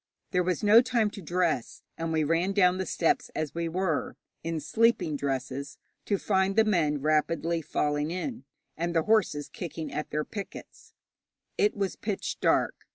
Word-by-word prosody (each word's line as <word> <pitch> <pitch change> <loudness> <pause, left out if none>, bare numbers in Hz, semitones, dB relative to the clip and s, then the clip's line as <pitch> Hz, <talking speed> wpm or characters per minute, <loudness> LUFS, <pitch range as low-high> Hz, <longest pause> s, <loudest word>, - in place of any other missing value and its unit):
There 180 - +2
was 180 0 -1
no 215 +3 +8
time 230 -4 +1
to 200 - -9
dress, 170 -6 -1
and 165 0 -3
we 160 -1 +2
ran 165 +5 +1
down 185 -2 +4
the 190 - -2
steps 165 - +1
as 150 -2 -2
we 170 0 -2
were 175 -2 -1 0.3
(in 165 -1 -2
sleeping 175 0 +2
dresses), 140 0 -3 0.3
to 200 - +1
find 190 0 +1
the 220 - +6
men 160 -9 +1
rapidly 165 +2 +1
falling 150 0 -1
in, 230 - -4 0.3
and 170 +1 -2
the 165 - +3
horses 210 -9 +2
kicking 160 -2 -6
at 150 - -3
their 150 0 -1
pickets. 200 -3 -9 0.6
It 210 +1 +2
was 195 -2 -1
pitch 205 -2 -3
dark. - - +2
170 Hz, 165 wpm, -28 LUFS, 155-195 Hz, 0.6 s, no